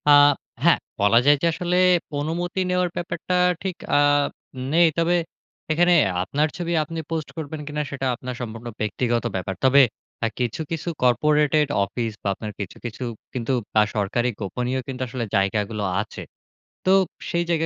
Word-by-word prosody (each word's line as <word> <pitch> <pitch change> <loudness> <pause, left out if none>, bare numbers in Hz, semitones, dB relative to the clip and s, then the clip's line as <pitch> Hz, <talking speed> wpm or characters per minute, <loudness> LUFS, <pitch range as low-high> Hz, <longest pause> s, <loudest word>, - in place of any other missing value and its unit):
আ - - +8 0.5
হ্যাঁ, - - +5 0.2
বলা 100 +3 +5
যায় 145 +1 +7
যে, - - +1
আসলে 180 +2 -1 0.4
অনুমতি 175 +5 -2
নেওয়ার 180 0 +1
ব্যাপারটা 170 +1 -3 0.3
ঠিক 190 -2 -2 0.2
আ - - +6 0.8
নেই। 170 +1 +6
তবে 165 +1 +3 0.6
এখানে 175 +3 +4 0.3
আপনার 145 +10 +1
ছবি 175 -1 -3
আপনি 165 +2 -6
পোস্ট 160 -3 -3
করবেন 155 -1 -5
কিনা? 150 0 -2
সেটা 135 -1 -3
আপনার 125 +1 -6
সম্পূর্ণ 115 0 -6
ব্যক্তিগত 120 +2 0
ব্যাপার। 95 0 -3
তবে 135 +2 +7 0.4
আ - - +3
কিছু, 125 +4 -1
কিছু, 165 0 -4 0.2
কর্পোরেটেড 150 +4 +3 0.2
অফিস 115 +3 -3
বা - - -2
আপনার 105 +2 -6
কিছু, 100 -3 -5
কিছু, 120 +1 -5 0.3
কিন্তু 125 0 -2 0.3
আ - - +7
সরকারি 110 +4 0
গোপনীয় 125 +6 -2
কিন্তু 130 -1 -5
আসলে 120 0 -3
জায়গাগুলো 105 +2 0 0.2
আছে। - - -8 0.6
তো 185 - +4 0.4
সেই 170 0 +1
জায়গা 165 -1 +2
135 Hz, 155 wpm, -23 LUFS, 115-165 Hz, 0.8 s, আ